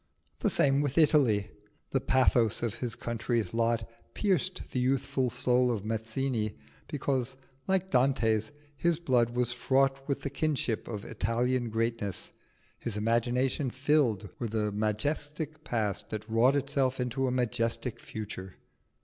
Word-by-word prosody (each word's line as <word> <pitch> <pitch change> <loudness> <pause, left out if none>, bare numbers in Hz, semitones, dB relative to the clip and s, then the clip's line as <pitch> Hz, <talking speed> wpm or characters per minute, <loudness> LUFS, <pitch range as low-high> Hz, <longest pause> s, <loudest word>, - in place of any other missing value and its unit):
The - - +2
same 140 0 +3
with 145 0 -2
Italy: 130 -10 +4 0.4
the 135 - +1
pathos 120 -4 +3
of 115 -3 0
his 120 -1 -3
country's 115 -3 -2
lot 115 0 +1 0.3
pierced 190 -8 0
the 125 - -1
youthful 130 0 +1
soul 125 +1 +2
of 105 -4 -3
Mazzini, 110 - -2 0.3
because, 135 -3 -1 0.3
like 190 0 +1
Dante's, 120 -4 +2 0.2
his 170 +4 +2
blood 125 -8 +2
was 120 0 0
fraught 135 +2 +1
with 140 - -1
the 140 - -3
kinship 140 -6 -1
of 105 -3 -5
Italian 120 +1 0
greatness, 110 -4 -2 0.5
his 110 -3 -4
imagination 120 +5 +1
filled 130 -6 +1
with 115 -2 -3
a 105 -1 +1
majestic 145 +9 -2
past 110 -8 -1
that 110 0 -5
wrought 120 +5 +4
itself 135 -2 0
into 125 +2 0
a - - 0
majestic 125 -1 -1
future. 100 -3 -7
125 Hz, 135 wpm, -30 LUFS, 115-135 Hz, 0.5 s, Italy